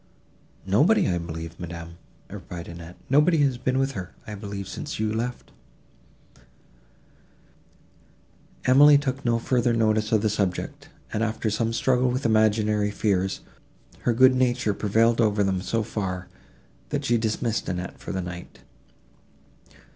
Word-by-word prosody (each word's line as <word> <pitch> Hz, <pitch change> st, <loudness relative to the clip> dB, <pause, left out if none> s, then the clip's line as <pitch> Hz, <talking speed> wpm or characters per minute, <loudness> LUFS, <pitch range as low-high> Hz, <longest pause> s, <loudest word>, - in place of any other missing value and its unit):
"Nobody, 145 Hz, -, +3 dB
I 90 Hz, -2 st, 0 dB
believe, 80 Hz, -1 st, -7 dB
ma'am," 85 Hz, 0 st, -8 dB, 0.3 s
replied 85 Hz, -1 st, -8 dB
Annette, 85 Hz, 0 st, -10 dB
"nobody 150 Hz, +5 st, +4 dB
has 130 Hz, -3 st, 0 dB
been 130 Hz, +1 st, 0 dB
with 135 Hz, +1 st, +1 dB
her, 95 Hz, -8 st, -7 dB
I 105 Hz, -, -7 dB
believe, 100 Hz, -2 st, -6 dB
since -, -, -6 dB
I -, -, 0 dB
left 115 Hz, +3 st, -3 dB, 0.8 s
you." -, -, -24 dB, 2.2 s
Emily 145 Hz, +3 st, +7 dB
took 140 Hz, -1 st, -3 dB
no 115 Hz, -1 st, +2 dB
further 120 Hz, 0 st, +1 dB
notice 110 Hz, -1 st, +1 dB
of 110 Hz, -2 st, +2 dB
the 110 Hz, -, +2 dB
subject, 110 Hz, -, -3 dB, 0.2 s
and, 110 Hz, -, -1 dB
after 110 Hz, -1 st, -1 dB
some 115 Hz, +2 st, 0 dB
struggle 125 Hz, +2 st, +2 dB
with 130 Hz, +2 st, -2 dB
imaginary 110 Hz, -1 st, +2 dB
fears, 95 Hz, -2 st, -1 dB, 0.6 s
her 120 Hz, -, +1 dB
good 130 Hz, +3 st, +6 dB
nature 125 Hz, -4 st, +1 dB
prevailed 115 Hz, +4 st, +2 dB
over 105 Hz, -2 st, +2 dB
them 95 Hz, -2 st, 0 dB
so 115 Hz, +3 st, -1 dB
far, 90 Hz, -4 st, -4 dB, 0.6 s
that -, -, -2 dB
she 120 Hz, -1 st, +2 dB
dismissed 110 Hz, +1 st, -1 dB
Annette 90 Hz, 0 st, -5 dB
for -, -, -7 dB
the 95 Hz, -, -2 dB
night. 90 Hz, 0 st, -9 dB
110 Hz, 140 wpm, -25 LUFS, 95-125 Hz, 2.2 s, Emily